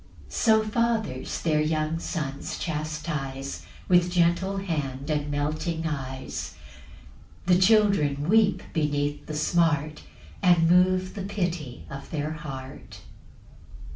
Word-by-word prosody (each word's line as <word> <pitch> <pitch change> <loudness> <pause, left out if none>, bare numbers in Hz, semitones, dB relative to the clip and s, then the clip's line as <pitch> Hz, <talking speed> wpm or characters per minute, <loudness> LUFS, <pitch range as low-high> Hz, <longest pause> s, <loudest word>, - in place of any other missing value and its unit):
6 - - -9
So 220 -1 +4
fathers 220 - -1
their 155 -2 +2
young 155 +1 0
sons 140 -5 -4
chastise, 150 -4 -4 0.2
With 175 -1 +4
gentle 175 +3 +2
hand 145 -7 -3
and 150 -1 -1
melting 155 +3 -2
eyes; 130 - -4 0.9
The 180 0 +4
children 185 -9 +3
weep 215 +1 +4
beneath 145 -2 -1
the 155 - -4
smart, 155 -2 +1 0.4
And 175 -3 +5
move 185 +1 +3
the 205 - -5
pity 175 -9 -3
of 140 0 -8
their 150 -1 -2
heart. 135 -4 -8
155 Hz, 110 wpm, -26 LUFS, 145-180 Hz, 0.9 s, And